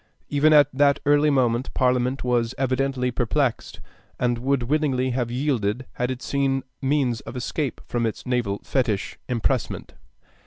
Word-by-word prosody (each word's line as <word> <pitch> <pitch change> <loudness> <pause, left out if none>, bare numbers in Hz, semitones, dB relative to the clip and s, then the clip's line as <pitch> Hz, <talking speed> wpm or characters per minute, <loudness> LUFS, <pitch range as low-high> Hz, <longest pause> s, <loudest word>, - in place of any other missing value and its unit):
Even 145 +2 +3
at 150 -2 +7
that 140 +1 +3
early 145 +1 +4
moment 125 -3 +1
Parliament 125 0 +1
was 120 -1 0
evidently 130 -1 0
perplexed, 125 +1 -1 0.4
and 120 -1 +1
would 135 0 0
willingly 130 -2 +1
have 120 -1 -1
yielded 125 -3 -1
had 125 0 -2
it 130 -1 -5
seen 135 -1 0 0.2
means 135 -4 +1
of - - -9
escape 130 +2 -3
from 120 -1 -1
its 110 - -6
naval 120 -6 0
fetich, 115 -7 -1
impressment. 125 0 -1
130 Hz, 145 wpm, -24 LUFS, 120-140 Hz, 0.4 s, at